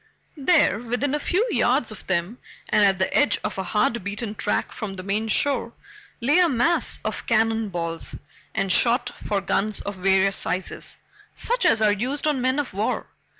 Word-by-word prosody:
There, 275 - +3
within 245 +4 -2
a 295 - 0
few 380 +10 +1
yards 245 - +2
of 215 - -11
them 190 +6 -1 0.3
and 210 - +4
at 195 -2 +4
the 190 - -1
edge 260 -9 +3
of - - -3
a - - -1
hard 220 +4 0
beaten 205 +2 -4
track 210 - -1
from 200 -3 -6
the 185 - -7
main 205 +3 -1
shore, 235 0 +1 0.5
lay 285 +8 +3
a 355 -2 +5
mass 300 +6 +1
of - - -4
cannon 225 -1 +2
balls 165 -2 -4 0.4
and 195 - 0
shot 240 +6 +3 0.2
for 200 -2 0
guns 205 +1 -1
of 200 -1 -6
various 195 +1 +3
sizes, 185 +1 -2 0.4
such - - 0
as 220 -1 +4
are 210 - +5
used 255 +9 -2
on 295 -4 +1
men 260 +2 +1
of 290 -7 -2
war. 205 +3 -2
220 Hz, 185 wpm, -24 LUFS, 195-260 Hz, 0.5 s, a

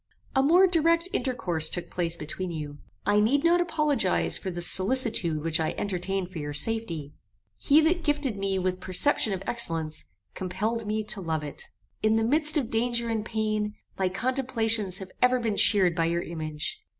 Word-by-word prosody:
"A 265 - +4
more 340 +7 +5
direct 335 0 +2
intercourse 175 - -1
took 175 - -5
place 170 -1 -2
between 170 +4 -4
you. 150 -3 -6 0.3
I 205 +1 +3
need 265 +8 +2
not 345 +1 +4
apologize 300 - +1
for 190 - -4
the 175 -1 -5
solicitude 185 - +2
which 165 0 +1
I 160 - -1
entertained 190 -1 -3
for 175 - -6
your 145 -1 -5
safety. 165 -5 0 0.5
He 300 +2 +4
that 335 +2 +1
gifted 290 -6 0
me 195 -1 -2
with 185 0 -1
perception 205 +5 +2
of 190 -1 -3
excellence, 165 -9 -2 0.3
compelled 210 +5 -3
me 215 +1 -1
to 210 -1 -1
love 160 -3 -2
it. 145 - -7 0.4
In 215 0 +2
the 225 - +2
midst 305 +6 +3
of 260 -6 -2
danger 235 +1 0
and 220 -2 -1
pain, 215 -1 -2 0.2
my 190 -1 0
contemplations 225 -3 0
have 190 -1 -8
ever 250 0 +4
been 225 -3 -1
cheered 190 -4 +5
by 165 - +1
your 170 +1 -1
image. 155 -2 -5
210 Hz, 175 wpm, -26 LUFS, 175-250 Hz, 0.5 s, more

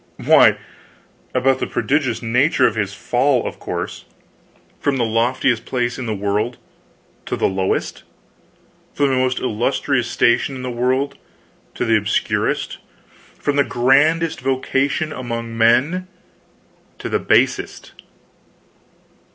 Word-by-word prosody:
Why, - - +6 0.8
about 130 +1 +2
the - - -2
prodigious 130 -5 -1
nature 125 +4 +2
of 115 - +2
his 100 -3 -2
fall, 125 +6 +1
of - - -6
course - - -5 0.7
from 140 -2 0
the 120 - +1
loftiest 115 +1 +1
place 125 -1 -2
in 125 - -4
the 110 - -2
world 105 +4 -1 0.7
to - - -1
the - - +2
lowest; 95 0 -2 0.9
from 145 -1 +2
the 130 - +1
most 130 0 +1
illustrious 125 +2 -1
station 120 +4 +2
in 130 - -7
the 125 - -3
world 130 +3 -1 0.6
to - - -1
the 115 0 +4
obscurest; 105 -1 -1 0.6
from 145 -1 -1
the 140 - +5
grandest 145 +7 +2
vocation 135 +3 0
among 115 -2 -5
men 130 +11 +2 0.9
to - - -6
the - - 0
basest. - - 0
125 Hz, 125 wpm, -19 LUFS, 115-135 Hz, 0.9 s, Why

